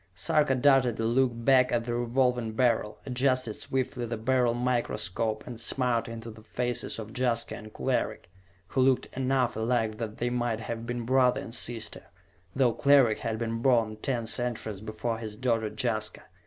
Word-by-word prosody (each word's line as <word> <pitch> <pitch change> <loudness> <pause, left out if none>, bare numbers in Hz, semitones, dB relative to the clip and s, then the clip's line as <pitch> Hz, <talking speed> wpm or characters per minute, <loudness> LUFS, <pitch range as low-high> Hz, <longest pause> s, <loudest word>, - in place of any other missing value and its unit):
Sarka 135 - +2
darted 130 -3 +3
a 115 - 0
look 130 +3 +3
back 125 +2 +3
at 115 -1 0
the 120 - -2
Revolving 120 -1 +1
Beryl, 115 -3 +1
adjusted 130 -3 +1
swiftly 130 0 -3
the 115 0 -3
Beryl 120 +1 +2
microscope, 115 -3 -1
and 120 -2 -7
smiled 125 -3 0
into 115 0 -7
the 110 0 -13
faces 120 +2 -2
of 110 +1 -8
Jaska 120 -2 0
and 110 0 -10
Cleric, 85 - -2 0.4
who 130 - +1
looked 130 0 +2
enough 130 -1 +1
alike 110 -1 0
that 110 -2 -4
they 120 +1 -1
might 120 -2 -1
have 115 +1 -5
been 120 -1 -3
brother 130 0 +3
and 115 - -8
sister, 115 -2 -2 0.5
though 125 -3 +3
Cleric 135 -6 +4
had 115 -2 -2
been 115 0 -3
born 115 -4 +3
ten 120 0 -2
centuries 110 -4 -2
before 110 +1 -3
his 110 -2 -6
daughter 115 -3 0
Jaska. 110 -2 -2
120 Hz, 170 wpm, -28 LUFS, 110-125 Hz, 0.5 s, Cleric